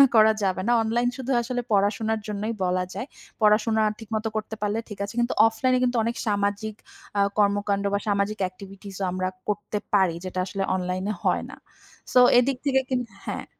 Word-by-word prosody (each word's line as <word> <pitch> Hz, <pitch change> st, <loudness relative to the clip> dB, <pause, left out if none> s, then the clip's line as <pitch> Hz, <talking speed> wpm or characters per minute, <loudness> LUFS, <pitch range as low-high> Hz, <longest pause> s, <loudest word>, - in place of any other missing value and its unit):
তুলনা 275 Hz, -, +10 dB
করা 220 Hz, 0 st, +7 dB
যাবে 185 Hz, -1 st, 0 dB
না। -, -, +4 dB
অনলাইন 240 Hz, +2 st, +1 dB
শুধু 265 Hz, -1 st, -5 dB
আসলে 245 Hz, +1 st, -2 dB
পড়াশোনার 215 Hz, +2 st, +1 dB
জন্যই 210 Hz, +2 st, -2 dB
বলা 180 Hz, 0 st, +1 dB
যায়। 260 Hz, -, -5 dB, 0.3 s
পড়াশোনা 215 Hz, +1 st, +4 dB, 0.2 s
ঠিকমত 220 Hz, 0 st, -4 dB
করতে 215 Hz, +1 st, -3 dB
পারলে 210 Hz, +1 st, 0 dB
ঠিক 210 Hz, -3 st, -8 dB
আছে। 205 Hz, -, -7 dB
কিন্তু 240 Hz, -, 0 dB
অফলাইনে 255 Hz, +3 st, +2 dB
কিন্তু 245 Hz, -1 st, +1 dB
অনেক 235 Hz, +1 st, -1 dB
সামাজিক 205 Hz, +1 st, 0 dB, 0.4 s
আ -, -, +4 dB, 0.2 s
কর্মকাণ্ড 200 Hz, -1 st, +2 dB
বা 200 Hz, -, +2 dB
সামাজিক 205 Hz, +1 st, 0 dB
এক্টিভিটিসও 195 Hz, +1 st, -8 dB
আমরা 185 Hz, 0 st, -1 dB, 0.2 s
করতে 210 Hz, 0 st, -2 dB, 0.2 s
পারি 190 Hz, -4 st, +4 dB
যেটা 185 Hz, 0 st, -5 dB
আসলে 195 Hz, 0 st, -3 dB
অনলাইনে 185 Hz, +3 st, -2 dB
হয় -, -, +1 dB
না। -, -, -10 dB, 0.6 s
সো 250 Hz, -, +7 dB, 0.2 s
এদিক 255 Hz, +1 st, +2 dB
থেকে 265 Hz, -1 st, +4 dB
কিন্তু 245 Hz, -3 st, -1 dB, 0.2 s
হ্যাঁ। -, -, -4 dB
210 Hz, 175 wpm, -25 LUFS, 200-230 Hz, 0.6 s, তুলনা